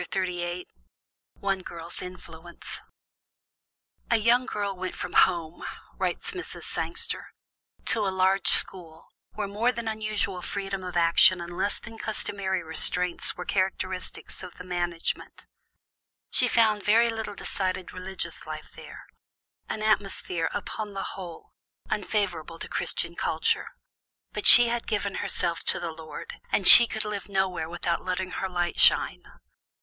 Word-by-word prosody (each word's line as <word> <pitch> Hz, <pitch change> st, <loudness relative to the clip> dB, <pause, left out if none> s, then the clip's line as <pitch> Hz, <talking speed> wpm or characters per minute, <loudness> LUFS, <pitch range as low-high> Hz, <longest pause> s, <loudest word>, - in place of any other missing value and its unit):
ONE 195 Hz, -1 st, 0 dB
GIRL'S 170 Hz, -1 st, -5 dB
INFLUENCE 175 Hz, -2 st, -9 dB, 1.3 s
"A 235 Hz, -, +3 dB
young 240 Hz, +4 st, +3 dB
girl 200 Hz, -4 st, -3 dB
went 185 Hz, 0 st, -5 dB
from -, -, -6 dB
home," 170 Hz, -3 st, +2 dB, 0.3 s
writes 455 Hz, -, -2 dB
Mrs. 365 Hz, -4 st, -7 dB
Sangster, -, -, -4 dB, 0.6 s
"to 215 Hz, -3 st, 0 dB
a -, -, +2 dB
large 190 Hz, -1 st, +1 dB
school 165 Hz, -3 st, -2 dB, 0.2 s
where 210 Hz, -1 st, -3 dB
more 215 Hz, +5 st, 0 dB
than 225 Hz, -3 st, -5 dB
usual 210 Hz, -4 st, -2 dB
freedom 195 Hz, 0 st, -4 dB
of 180 Hz, -1 st, -4 dB
action 170 Hz, +2 st, +6 dB
and 170 Hz, 0 st, -7 dB
less 195 Hz, +3 st, +2 dB
than 225 Hz, -1 st, -11 dB
customary 195 Hz, -4 st, -3 dB
restraints 175 Hz, +2 st, +1 dB
were 180 Hz, -, -6 dB
characteristics 185 Hz, -1 st, -3 dB
of 180 Hz, -, -10 dB
the 180 Hz, -, -9 dB
management. 175 Hz, -2 st, -4 dB, 0.9 s
She -, -, +3 dB
found 215 Hz, -2 st, +3 dB
very 230 Hz, +3 st, +4 dB
little 220 Hz, -2 st, -5 dB
decided 185 Hz, -2 st, -3 dB
religious 185 Hz, +1 st, -6 dB
life -, -, -8 dB
there -, -, -12 dB, 0.6 s
an 215 Hz, -, -4 dB
atmosphere, 195 Hz, -5 st, 0 dB
upon 205 Hz, 0 st, -5 dB
the 195 Hz, -, -4 dB
whole, 175 Hz, -4 st, -10 dB, 0.4 s
unfavorable 180 Hz, -5 st, -2 dB
to -, -, -6 dB
Christian 170 Hz, -, -2 dB
culture. 160 Hz, -1 st, -1 dB, 0.7 s
But -, -, 0 dB
she 240 Hz, 0 st, +12 dB
had 235 Hz, 0 st, -3 dB
given 205 Hz, -2 st, -2 dB
herself 170 Hz, -1 st, -1 dB
to -, -, +2 dB
the 170 Hz, -, -4 dB
Lord, 160 Hz, -1 st, -10 dB
and 195 Hz, -, +1 dB
she 235 Hz, -, +13 dB
could 220 Hz, -1 st, -2 dB
live 210 Hz, -1 st, -5 dB
nowhere 185 Hz, -5 st, -1 dB
without 170 Hz, 0 st, -2 dB
letting 185 Hz, 0 st, -3 dB
her 190 Hz, -, -3 dB
light 175 Hz, -1 st, -2 dB
shine. -, -, +4 dB
190 Hz, 135 wpm, -26 LUFS, 175-210 Hz, 1.3 s, she